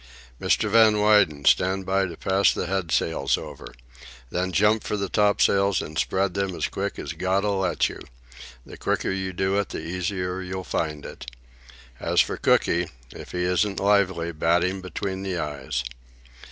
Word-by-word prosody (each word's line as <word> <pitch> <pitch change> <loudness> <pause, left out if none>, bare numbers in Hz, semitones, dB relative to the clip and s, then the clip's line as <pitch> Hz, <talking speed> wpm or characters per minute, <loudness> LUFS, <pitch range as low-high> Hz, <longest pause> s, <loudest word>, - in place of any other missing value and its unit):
"Mr. 105 - +2
Van 110 0 +6
Weyden, 105 -9 +3
stand 95 +1 +3
by 95 0 +1
to 85 -2 -9
pass 95 0 +3
the - - -3
head 90 -2 -2
sails 80 -4 +1
over. - - -9 0.6
Then 90 +1 -1
jump 105 +4 +3
for 105 - -2
the 100 -2 -2
topsails 100 -1 +3
and 75 - -6
spread 95 +3 0
them 95 -3 -2
quick - - -3
as - - -5
God'll 95 +1 0
let 95 -2 +1
you—the - - -13
quicker - - -1
you 95 0 -2
do 95 +2 0
it 100 - -2
the - - -5
easier 90 +1 -3
you'll 95 0 -5
find 75 -4 -3
it. - - -9 0.7
As - - +1
for - - +2
Cooky, 85 0 +2 0.2
if - - -10
he 90 0 -2
isn't 90 +2 +1
lively 95 -4 +2
bat 85 +2 +2
him 95 +1 -1
between 95 +1 -4
the 95 -2 -3
eyes." 70 -5 -3
95 Hz, 165 wpm, -24 LUFS, 85-100 Hz, 0.7 s, Van